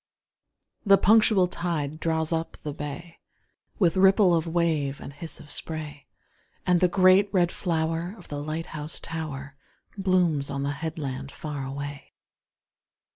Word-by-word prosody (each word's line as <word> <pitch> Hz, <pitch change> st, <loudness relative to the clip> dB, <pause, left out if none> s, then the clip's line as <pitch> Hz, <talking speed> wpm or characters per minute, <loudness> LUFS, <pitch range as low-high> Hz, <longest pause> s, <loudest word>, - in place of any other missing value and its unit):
The 200 Hz, -3 st, +6 dB
punctual 210 Hz, -2 st, +5 dB
tide 160 Hz, -4 st, -3 dB
draws 160 Hz, 0 st, 0 dB
up 165 Hz, 0 st, -3 dB
the 150 Hz, -, -4 dB
bay, 150 Hz, +4 st, -7 dB, 0.6 s
With 175 Hz, -4 st, +3 dB
ripple 190 Hz, 0 st, +5 dB
of 165 Hz, 0 st, +1 dB
wave 160 Hz, -5 st, 0 dB
and 140 Hz, -, -9 dB
hiss 160 Hz, +3 st, -7 dB
of 145 Hz, -, -9 dB
spray, 150 Hz, -3 st, -6 dB, 0.6 s
And 180 Hz, -1 st, +4 dB
the 180 Hz, -, +4 dB
great 185 Hz, +2 st, +5 dB
red 180 Hz, -3 st, +2 dB
flower 165 Hz, +1 st, -1 dB
of -, -, -14 dB
the 145 Hz, -1 st, -4 dB
light 155 Hz, +2 st, -3 dB
house 155 Hz, +1 st, -4 dB
tower 145 Hz, -4 st, -6 dB, 0.4 s
Blooms 180 Hz, -7 st, +1 dB
on 140 Hz, 0 st, -3 dB
the 140 Hz, -, 0 dB
headland 140 Hz, -3 st, -5 dB
far 150 Hz, -3 st, -5 dB
away. 140 Hz, +1 st, -7 dB
160 Hz, 140 wpm, -26 LUFS, 145-180 Hz, 0.6 s, The